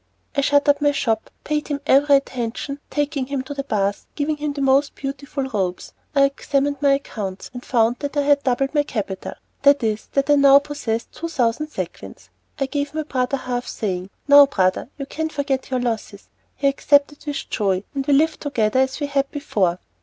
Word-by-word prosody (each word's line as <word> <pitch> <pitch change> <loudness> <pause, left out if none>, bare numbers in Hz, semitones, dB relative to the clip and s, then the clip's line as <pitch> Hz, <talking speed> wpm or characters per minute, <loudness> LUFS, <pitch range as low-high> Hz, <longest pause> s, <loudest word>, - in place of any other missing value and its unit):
I 280 - +2
shut 285 +1 +3
up 285 0 +4
my 290 0 +4
shop, 225 -6 -1
paid 300 0 -2
him 290 -2 -2
every 280 +1 +5
attention, 265 +1 -2
taking 290 -3 -1
him 275 -1 -2
to 265 - -6
the 275 -1 -4
bath, 200 -6 -1
giving 300 +1 -1
him 295 -1 -3
my 280 - 0
most 275 +2 +3
beautiful 275 0 -4
robes. 195 -8 -3 0.2
I 275 - +5
examined 275 +1 0
my 280 -1 +4
accounts, 205 -8 -4
and 245 0 -8
found 235 0 +2
that 285 0 -4
I 290 - +3
had 285 0 +3
doubled 270 +1 0
my 295 - +4
capital 205 -9 -4 0.3
that 280 -2 +5
is, 215 -1 -1
that 275 0 +1
I 290 - +6
now 280 0 +8
possessed 285 -6 -3
two 335 - -5
thousand 275 -1 0
sequins. 95 - -7 0.3
I 275 - +1
gave 285 +2 -3
my 310 - -1
brother 260 -2 -1
half, 245 -1 -4
saying: 185 -3 -3 0.2
"Now, 285 0 +9
brother, 185 -3 0
you 275 - -5
can 315 +3 -3
forget 280 -3 -2
your 255 -1 0
losses." 225 -4 -4 0.3
He 280 - 0
accepted 285 +1 +2
them 300 - -7
with - - -6
joy, 195 -3 0
and 275 -1 -2
we 290 - +4
lived 315 +3 +2
together 245 -5 +1
as 265 +1 +1
we 290 - -1
had 280 -1 0
before. 200 - 0
275 Hz, 200 wpm, -22 LUFS, 230-285 Hz, 0.3 s, Now